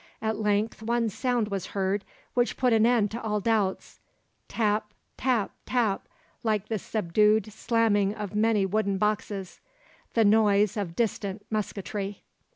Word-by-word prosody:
At 220 -1 -2
length 210 +1 0
one 230 0 0
sound 240 0 0
was 195 -3 -3
heard 195 +1 0 0.3
which 245 -1 +1
put 250 -2 +3
an 225 0 +5
end 230 -4 +3
to 235 +2 -5
all 210 -1 -1
doubts, 205 -3 -1 0.5
tap, 210 -1 0 0.2
tap, 245 -6 0 0.2
tap, 230 -6 0 0.3
like 215 -2 -1
the 220 -2 -1
subdued 210 +2 +2
slamming 215 -3 +2
of 210 -2 -5
many 210 -1 +2
wooden 200 0 0
boxes 205 -2 -2 0.6
the 225 -2 +5
noise 205 -1 +4
of 190 -6 -3
distant 205 -3 -2
musketry. 205 -1 -3
210 Hz, 140 wpm, -27 LUFS, 200-225 Hz, 0.6 s, an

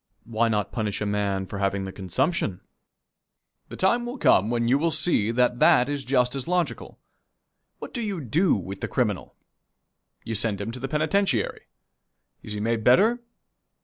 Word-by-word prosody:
Why 115 0 0
not 105 -2 -1
punish 105 -4 -2
a 105 - -2
man 100 -2 -1
for 100 +1 -7
having 100 0 -1
the 95 - -6
consumption? 95 - -2 1.1
The - - -8
time 235 +6 +2
will 240 +3 -5
come 105 - +4
when 120 -1 0
you 130 +4 +3
will 165 +2 +1
see 155 -9 +1
that 125 +1 +1
that 125 +2 +5
is 145 -1 -3
just 125 -1 +1
as 135 0 -5
logical. 180 -1 -2 0.8
What - - -9
do 240 - -3
you 205 -5 -3
do 160 - +2
with 95 0 -6
the - - -2
criminal? 110 -7 -2 0.9
You 115 - -4
send 105 -2 -1
him 100 +3 -4
to 125 - -6
the 135 - -3
penitentiary. 155 - 0 0.7
Is 105 - -7
he 105 - -4
made 115 +1 -1
better? 210 - +4
120 Hz, 175 wpm, -25 LUFS, 105-155 Hz, 1.1 s, that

